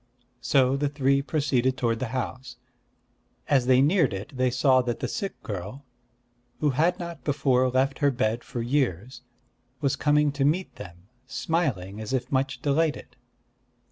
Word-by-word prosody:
So 135 -1 +3
the 145 0 0
three 140 -1 +1
proceeded 135 -4 0
toward 115 -3 0
the 130 - -2
house. 130 +1 -5 0.9
As 130 -3 +2
they 130 0 +5
neared 160 - +2
it, 105 +9 -8
they 130 0 +2
saw 130 +1 +3
that 120 -2 -3
the - - -2
sick 200 -4 -4
girl, 105 +7 -6 0.7
who 150 -2 +2
had 165 +7 +1
not 170 -2 -7
before 135 -3 +2
left 135 +2 0
her 145 - +4
bed 120 -2 -1
for 120 -3 -5
years, 125 - -1 0.6
was 140 -1 0
coming 150 0 +2
to 140 0 -2
meet 165 +7 0
them, 85 +1 -11 0.2
smiling 125 - -2
as 110 +4 -5
if 130 +2 -2
much 135 -1 -1
delighted. 150 +2 0
130 Hz, 155 wpm, -26 LUFS, 125-145 Hz, 0.9 s, they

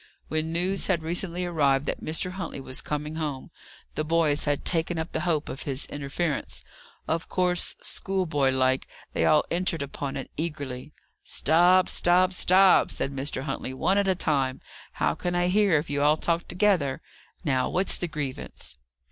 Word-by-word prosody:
When 155 +1 -1
news 180 +3 +1
had 170 -5 +1
recently 175 +2 0
arrived 145 -5 +2
that - - -3
Mr. 165 +4 -1
Huntley 180 -6 -5
was 130 -1 -3
coming 150 +1 -4
home, 145 -5 -4 0.4
the 155 - -2
boys 155 -2 +2
had 145 -1 -1
taken 170 0 0
up 160 +1 -3
the - - -2
hope 155 -2 0
of 135 - -6
his 135 -1 -1
interference. 145 +2 -3 0.4
Of 165 +1 -2
course, 180 -1 0
schoolboy 170 -8 0
like, 130 0 +1 0.3
they - - +1
all 150 -1 +4
entered 170 -3 0
upon 140 0 -5
it 135 - -7
eagerly. 145 -4 -5 0.3
"Stop, 180 +3 +3
stop, 180 +2 +3
stop!" 185 +1 +5
said 135 - -3
Mr. 135 0 -2
Huntley. 135 -2 -4
"One 190 +8 +2
at 200 - +1
a 190 - +3
time. 135 -6 0 0.3
How - - +1
can 175 0 -3
I 175 0 +2
hear, 200 -3 +4
if 150 - -2
you 145 0 -1
all 150 +2 +4
talk 170 +1 -1
together? 175 -8 +1 0.4
Now, 130 -3 +1
what's 190 +2 +2
the 175 - -1
grievance?" 140 - -6
160 Hz, 170 wpm, -26 LUFS, 140-180 Hz, 0.4 s, stop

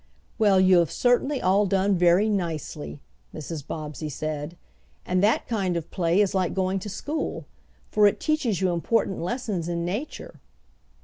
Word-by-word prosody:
"Well, 205 -3 +5
you 185 -1 +6
have 170 - +2
certainly 255 +3 +1
all 195 +2 +3
done 195 +1 +2
very 180 +4 +4
nicely," 165 -7 -3 0.3
Mrs. 155 -2 -6
Bobbsey 155 0 -5
said. 155 +3 -5 0.5
"And 180 0 +1
that 210 +3 +2
kind 190 -6 -1
of 170 0 -6
play 175 +1 +2
is 205 -1 +1
like 185 -3 0
going 190 0 0
to 210 - -7
school, 295 +10 -4 0.5
for 210 -1 +5
it 205 - 0
teaches 265 - 0
you 185 -1 +2
important 190 +3 0
lessons 195 -4 -3
in 170 0 -2
nature." 210 - -5
185 Hz, 160 wpm, -25 LUFS, 170-210 Hz, 0.5 s, you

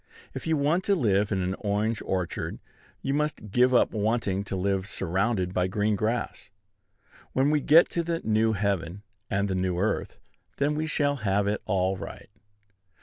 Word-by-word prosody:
If - - -6
you 160 -1 +2
want 155 +6 +1
to 200 - +3
live 105 - +1
in 95 -2 0
an 90 +1 -1
orange 105 +1 -1
orchard, 90 -3 -3 0.5
you 135 - 0
must 150 -8 -2
give 125 +4 +4
up 125 - +4
wanting 105 -2 0
to 100 - -4
live 95 +1 -1
surrounded 95 0 -1
by 90 0 +1
green 105 +2 0
grass. 110 -1 -2 0.8
When 135 +3 +3
we 150 -1 +2
get 160 +5 +6
to 170 - -1
the 170 0 -2
new 110 +1 +2
heaven 100 -2 -2 0.3
and 100 +1 0
the 95 - -1
new 90 -1 -1
earth, 100 +4 -1 0.4
then 145 +2 +1
we 155 +1 -2
shall 145 -2 +1
have 100 -3 +1
it 105 +1 -1
all 95 0 +1
right. 95 - -9
105 Hz, 175 wpm, -27 LUFS, 95-135 Hz, 0.8 s, get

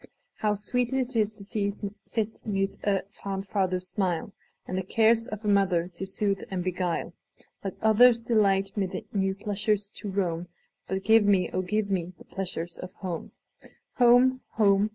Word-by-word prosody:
How 210 -1 +1
sweet 245 +4 -1
't 260 -3 0
is 215 0 +1 0.4
to 210 - -6 0.2
sit 220 -1 -3
'neath 195 -1 0
a 195 -2 +1
fond 195 -2 -5
father's 185 -2 0
smile, 185 0 -1 0.3
And 185 - -4
the 190 - 0
cares 225 +4 +3
of 215 0 -6
a - - 0
mother 190 -4 +3
to 185 +2 -6
soothe 195 0 -1
and 185 -2 -2
beguile! 180 -1 -2 0.5
Let 195 -2 -4
others 230 +2 +6
delight 200 -4 +2
mid 195 -3 -2
new 195 -1 +1
pleasures 205 0 -1
to 205 - -7
roam, 180 -3 -1 0.4
But 190 +1 -2
give 220 -1 +5
me, 190 -4 +3
oh, 185 - +1
give 200 +2 -1
me, 180 -1 -1
the - - -15
pleasures 175 -3 -5
of 185 - -7
home! 175 -4 -5 0.7
Home! 250 +1 +5
home! 200 -1 +4
200 Hz, 165 wpm, -27 LUFS, 185-215 Hz, 0.7 s, others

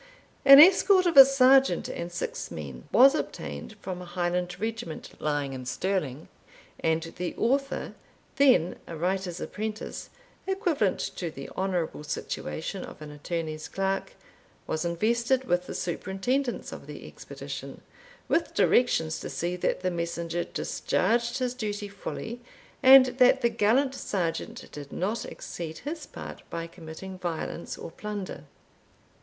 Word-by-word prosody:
An 275 0 +11
escort 375 +3 +7
of 345 - +2
a 270 - +13
sergeant 270 -6 +4
and 170 +1 -5
six 175 - -4
men 70 -5 -8
was 265 +6 +7
obtained 260 -6 -5
from 185 -2 -5
a - - -8
Highland 175 0 -2
regiment 220 -7 -5
lying 145 -2 -1
in 130 -1 -6
Stirling; 155 -1 -2 0.5
and 160 0 +1
the 180 -1 -3
Author, 275 +4 0 0.4
then 255 - +4
a 165 - -6
writer's 180 +1 -1
apprentice, 215 0 -5 0.4
equivalent 350 - +1 0.2
to 175 - -2
the 135 -3 -9
honourable 180 -5 -2
situation 160 +4 -4
of - - -10
an 150 - -8
attorney's 155 +1 -4
clerk, 195 - -2 0.5
was 155 - -2
invested 235 +9 +1
with 180 -6 0
the - - -6
superintendence 195 - -2
of - - -9
the - - -9
expedition, - - -8 0.5
with 335 - 0
directions 160 -10 +3
to - - -6
see 175 +1 -2
that 180 - -1
the 185 0 0
messenger 170 0 -2
discharged 235 +5 0
his 250 -2 -1
duty 210 -4 -4
fully, 225 +4 -6 0.4
and 265 0 +9
that 255 +1 +6
the 235 - +3
gallant 235 +5 +2
sergeant 175 -10 -3
did 145 -1 -9
not 205 +6 -2
exceed 160 -2 -7
his 305 - -6
part - - -9
by 165 0 -4
committing 170 +3 -9
violence 170 -1 -4
or - - -8
plunder. 205 0 -6
190 Hz, 140 wpm, -27 LUFS, 170-245 Hz, 0.5 s, a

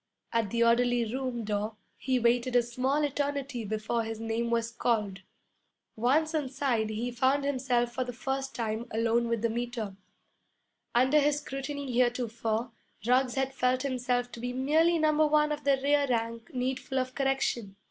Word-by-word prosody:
At 230 -3 +1
the 235 +3 +2
orderly 235 -1 +2
room 255 -3 -2
door 210 +1 -2 0.2
he 260 -1 0
waited 245 +1 +2
a 245 - +5
small 255 +5 0
eternity 280 -3 -2
before 220 +2 -1
his 225 -1 -5
name 225 +1 -1
was 230 -1 0
called. 210 -5 0 0.8
Once 290 +8 +2
inside 265 -6 0
he 225 +3 -3
found 260 +4 +2
himself 255 -3 0
for 255 - -1
the 250 - -5
first 270 +2 -3
time 230 0 -2
alone 230 +1 +1
with 230 -1 -1
the 230 - +2
Meter. 235 -4 -3 1.0
Under 260 +5 +5
his 295 0 +2
scrutiny 280 -1 -5
heretofore 235 -2 0 0.3
Ruggs 250 +1 +3
had 270 0 -1
felt 255 0 +1
himself 250 -2 -1
to - - -9
be 245 +1 -3
merely 315 +6 +3
number 310 -1 +3
one 300 0 +3
of 295 -1 -4
the 275 -1 +3
rear 285 0 +3
rank 230 +3 -2
needful 260 0 -2
of 255 0 -1
correction. 265 -7 -1
245 Hz, 160 wpm, -29 LUFS, 230-270 Hz, 1.0 s, a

